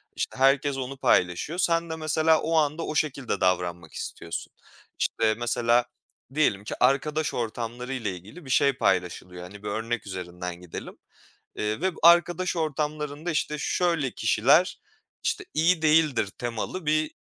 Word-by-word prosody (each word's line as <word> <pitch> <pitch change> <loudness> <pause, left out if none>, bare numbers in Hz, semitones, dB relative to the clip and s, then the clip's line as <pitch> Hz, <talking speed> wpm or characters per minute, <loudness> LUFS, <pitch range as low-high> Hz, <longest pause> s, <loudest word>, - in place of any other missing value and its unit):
İşte, - - -3
herkes 135 +1 +3
onu 135 +1 -5
paylaşıyor. 90 - +1
Sen 170 -2 +1
de 160 - -3
mesela 155 0 +2
o 165 +1 0
anda 155 +1 +1
o 155 - -4
şekilde 140 -8 -1
davranmak 90 -3 0
istiyorsun. 85 - -6 0.5
İşte, 110 -1 +1
mesela 120 +1 +2 0.5
diyelim 105 -10 +2
ki 105 - -5
arkadaş 145 +4 +2
ortamları 120 +2 -4
ile 115 -6 -2
ilgili 105 - -12
bir - - -10
şey 140 +1 +4
paylaşılıyor. 90 -5 -1
Hani, 100 +3 -11
bir - - -5
örnek 110 +1 -3
üzerinden 90 -2 -6
gidelim, 90 -2 -8 0.6
ııı, 105 +5 -1
ve 190 +1 +1
arkadaş 175 +2 +5
ortamlarında, 150 0 -2
işte, 150 -1 -1
şöyle 165 -5 0
kişiler, - - +3 0.4
işte, - - -1
iyi 165 +2 +3
değildir 155 -7 +3
temalı 120 +9 -4
bir 155 +1 +1
135 Hz, 145 wpm, -26 LUFS, 105-155 Hz, 0.6 s, arkadaş